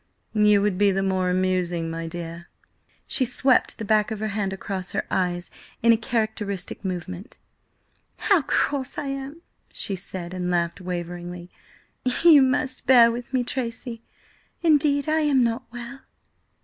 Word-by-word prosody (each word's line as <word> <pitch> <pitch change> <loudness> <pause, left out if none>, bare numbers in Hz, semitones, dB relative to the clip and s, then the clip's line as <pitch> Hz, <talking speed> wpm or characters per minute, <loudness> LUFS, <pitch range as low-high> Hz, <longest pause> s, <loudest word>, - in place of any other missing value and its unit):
"You 210 -2 +4
would 200 -3 0
be 205 -1 +5
the 195 0 0
more 190 -1 +1
amusing, 180 -2 0
my 165 0 -4
dear." 170 0 -7 0.6
She 265 - +2
swept 255 +1 +2
the 220 - -5
back 215 +1 +3
of 220 -2 -4
her 215 0 -2
hand 200 -2 -2
across 190 -1 -4
her - - -1
eyes 175 -1 -1 0.3
in 230 0 +7
a - - +5
characteristic 215 -5 -2
movement. 185 0 -5 0.8
"How 395 -6 +3
cross 270 -1 -1
I 285 - -3
am!" 275 +4 -6 0.3
she 200 - -2
said, 180 -1 -6
and 180 -1 -2
laughed 170 +1 -1
waveringly. 175 0 -6 0.7
"You 320 -5 +8
must 265 0 0
bear 235 -3 +7
with 240 +2 -6
me, 255 -2 +1
Tracy. 235 -1 -4 0.6
Indeed, 295 -2 +3
I 310 +1 +2
am 290 -4 +3
not 235 +2 -1
well." 240 +2 -8
210 Hz, 150 wpm, -24 LUFS, 180-255 Hz, 0.8 s, You